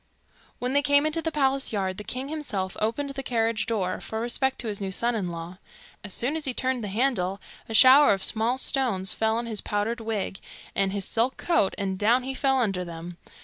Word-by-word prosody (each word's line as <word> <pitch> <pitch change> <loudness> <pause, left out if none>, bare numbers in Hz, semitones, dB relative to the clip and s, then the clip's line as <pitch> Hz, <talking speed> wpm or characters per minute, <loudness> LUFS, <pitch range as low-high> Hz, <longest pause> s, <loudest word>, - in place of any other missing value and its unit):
When 250 +1 -2
they 285 - +4
came 285 +1 +4
into 310 +1 +1
the 325 - -2
palace 275 -2 +1
yard, 190 -3 -2
the - - -6
king 255 +5 -5
himself 245 -12 -3
opened 255 +6 -1
the 275 0 -5
carriage 230 -3 0
door, 190 -5 -1
for 220 - -4
respect 260 +3 0
to 235 - -6
his 205 -1 -3
new 195 - -2
son 235 +6 +1
in 200 -6 -2
law. 170 +2 -7 0.4
As 205 - -5
soon 250 +10 0
as 320 - -3
he 260 -3 -2
turned 260 -2 -1
the - - -3
handle, 200 -3 0 0.3
a 225 - -2
shower 265 +5 +8
of 195 -1 0
small 230 +3 +2
stones 230 -9 0
fell 220 0 +1
on 235 - -2
his 220 -3 -2
powdered 210 +3 -2
wig 215 -3 -3 0.3
and 195 -1 +1
his 195 -1 -2
silk 235 +5 0
coat, 335 - +1
and 190 -1 -2
down 235 +5 +3
he 265 +1 -3
fell 270 0 +1
under 195 -7 0
them. 170 0 -8
225 Hz, 220 wpm, -26 LUFS, 195-265 Hz, 0.4 s, shower